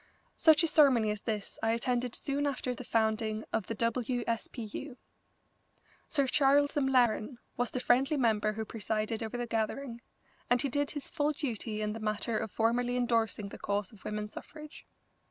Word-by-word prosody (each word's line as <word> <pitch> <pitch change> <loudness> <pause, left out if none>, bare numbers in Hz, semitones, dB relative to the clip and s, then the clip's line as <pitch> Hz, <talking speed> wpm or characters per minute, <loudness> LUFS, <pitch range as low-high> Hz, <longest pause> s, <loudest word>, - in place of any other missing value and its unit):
Such 315 0 +5
a - - +4
ceremony 260 -9 +5
as 210 -1 -4
this 215 -3 -4
I 225 0 +2
attended 245 +1 0
soon 285 0 -1
after 255 -2 -2
the 250 - -8
founding 220 -1 0
of 220 -4 0
the 225 - -3
W. 240 +2 0
S. 230 -1 -1
P. 235 - -7
U. 245 +5 -7 1.1
Sir 280 -3 +2
Charles 285 +2 +3
M'Laren 255 -3 +2 0.2
was 245 -1 0
the 255 - -3
friendly 270 +5 +3
member 215 -4 +2
who 220 +1 -4
presided 215 0 -2
over 225 +2 -3
the 240 - -2
gathering, 235 +2 -2 0.5
and 245 - +4
he 275 - 0
did 285 +3 0
his 290 -3 -5
full 295 +1 +1
duty 225 -6 -3
in 210 0 -1
the 225 - -6
matter 215 +1 -1
of 220 -1 -2
formally 240 +3 +1
endorsing 230 -4 0
the - - -10
cause 200 -1 -2
of 210 -4 -17
women's 210 0 -4
suffrage. 305 +5 -10
235 Hz, 180 wpm, -31 LUFS, 220-265 Hz, 1.1 s, Such